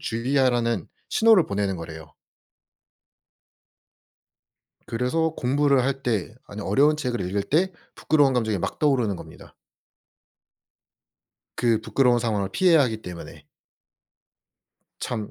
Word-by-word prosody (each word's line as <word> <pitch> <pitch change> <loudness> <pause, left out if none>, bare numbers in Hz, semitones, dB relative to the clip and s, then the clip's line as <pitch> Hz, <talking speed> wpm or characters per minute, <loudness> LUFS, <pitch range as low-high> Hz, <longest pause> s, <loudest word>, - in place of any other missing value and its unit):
주의하라는 120 - 0 0.2
신호를 220 -6 +5
보내는 100 -1 -2
거래요. 80 -2 -10 2.7
그래서 125 +8 0
공부를 140 +1 +2
할 135 +2 0
때 110 -6 -2
아니 105 +1 -8
어려운 140 +10 +2
책을 125 -4 -2
읽을 100 +2 -2
때 175 - +1 0.2
부끄러운 145 -3 +2
감정이 110 -4 0
막 - - -4
떠오르는 125 -9 +1
겁니다. - - -13 2.0
그 115 -3 +1
부끄러운 125 +1 +2
상황을 105 -4 -1
피해야 170 - +4
하기 110 -4 -1
때문에. 90 -2 -10 1.6
참 110 -4 -4
120 Hz, 250 characters per minute, -24 LUFS, 105-140 Hz, 2.7 s, 신호를